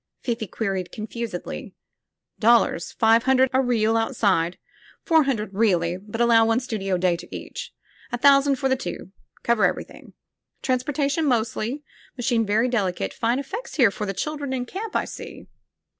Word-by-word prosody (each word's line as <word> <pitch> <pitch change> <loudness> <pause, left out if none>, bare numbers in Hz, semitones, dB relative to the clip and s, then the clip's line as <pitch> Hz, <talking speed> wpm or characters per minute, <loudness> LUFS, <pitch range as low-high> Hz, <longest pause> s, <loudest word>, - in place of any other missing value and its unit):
Fifi 230 -3 -2
queried 190 -2 -3
confusedly. 220 -3 -6 0.6
"Dollars. 230 -7 +3
Five 225 +1 +4
hundred 260 0 +4
a 260 - +4
reel, 225 -3 +1
outside. 200 -7 +1 0.5
Four 320 -4 +4
hun 270 -2 +2
dred, 210 -2 -6
really, 180 -5 +2
but 205 +4 -8
allow 235 -1 +5
one 225 +1 +2
studio 195 -7 -2
day 180 -1 +2
to - - -10
each. - - -7 0.4
A 245 - -1
thousand 275 +1 +5
for 270 +1 -1
the 260 - +2
two 255 -6 -7
— - - -34
cover 235 -2 +2
everything. - - -2 0.5
Transportation 280 +4 0
mostI3^ 240 +2 -1 0.4
]).Iachine 235 -2 +1
very 220 +4 +2
delicate. 190 - -1
Fine 235 +2 0
effects 385 - -6
here 245 -9 +5
for 210 +1 -4
the 195 - -2
children 290 0 -3
in 250 -1 -2
camp, 405 - -6
I - - +1
see." - - -9
235 Hz, 160 wpm, -24 LUFS, 210-265 Hz, 0.6 s, allow